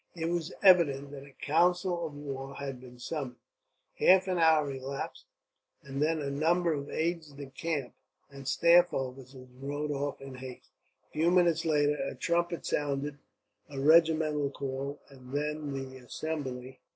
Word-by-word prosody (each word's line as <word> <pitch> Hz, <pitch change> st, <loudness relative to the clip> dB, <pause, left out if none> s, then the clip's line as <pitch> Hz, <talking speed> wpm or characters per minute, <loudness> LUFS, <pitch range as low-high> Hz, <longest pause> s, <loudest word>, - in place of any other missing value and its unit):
It 165 Hz, -1 st, -2 dB
was 170 Hz, 0 st, -2 dB
evident 145 Hz, -7 st, +5 dB
that 140 Hz, -1 st, -9 dB
a 140 Hz, -, -11 dB
council 175 Hz, +2 st, +2 dB
of 150 Hz, -, -11 dB
war 135 Hz, -1 st, -6 dB
had 135 Hz, -2 st, -5 dB
been 125 Hz, -1 st, -13 dB
summoned. 130 Hz, 0 st, -4 dB, 0.6 s
Half 190 Hz, +1 st, +6 dB
an 180 Hz, -2 st, 0 dB
hour 160 Hz, -3 st, +4 dB
elapsed, 135 Hz, +1 st, -5 dB, 0.6 s
and 140 Hz, 0 st, -5 dB
then 160 Hz, +1 st, +2 dB
a 140 Hz, -2 st, -3 dB
number 165 Hz, +4 st, +2 dB
of 140 Hz, -1 st, -4 dB
aides 165 Hz, -2 st, -2 dB
de 140 Hz, 0 st, -8 dB
camp 145 Hz, -2 st, -3 dB, 0.4 s
and 135 Hz, -1 st, -10 dB
staff 170 Hz, +6 st, +5 dB
officers 130 Hz, 0 st, -6 dB
rode 145 Hz, +2 st, -3 dB
off 140 Hz, 0 st, -2 dB
in 135 Hz, -1 st, -9 dB
haste. 130 Hz, -1 st, -10 dB, 0.4 s
A -, -, -40 dB
few 160 Hz, +3 st, +2 dB
minutes 170 Hz, -2 st, +3 dB
later, 150 Hz, -2 st, +2 dB
a 135 Hz, -, -4 dB
trumpet 170 Hz, +5 st, -1 dB
sounded 145 Hz, 0 st, -1 dB, 0.5 s
a 140 Hz, -2 st, -6 dB
regimental 155 Hz, -1 st, +4 dB
call, 140 Hz, +1 st, -4 dB
and 130 Hz, -1 st, -13 dB
then 150 Hz, 0 st, -2 dB
the 135 Hz, -1 st, -5 dB
assembly. 130 Hz, -1 st, -5 dB
145 Hz, 155 wpm, -30 LUFS, 135-165 Hz, 0.6 s, Half